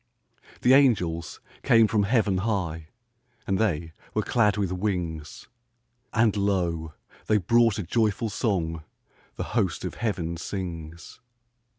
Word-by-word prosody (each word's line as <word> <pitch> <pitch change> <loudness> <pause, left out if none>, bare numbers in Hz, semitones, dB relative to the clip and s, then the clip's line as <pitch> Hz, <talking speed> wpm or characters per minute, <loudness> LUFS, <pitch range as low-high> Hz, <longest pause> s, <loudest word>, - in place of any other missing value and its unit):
The 125 - +6
angels 90 - +2 0.2
came 115 -1 +5
from 105 -1 +1
heaven 105 -4 +2
high, 90 -7 -2 0.6
And 95 -1 0
they 85 -7 0 0.2
were - - +1
clad 105 -4 +2
with 100 -3 -1
wings; 90 -5 -3 0.6
And 115 -2 +2
lo, 85 -6 -1 0.3
they 110 - +4
brought 115 +3 +3
a 105 - -2
joyful 110 +2 0
song 85 -8 -1 0.5
The - - -3
host 95 -7 0
of 90 - -4
heaven 90 -7 -2
sings. 85 -2 -6
95 Hz, 120 wpm, -26 LUFS, 85-110 Hz, 0.6 s, The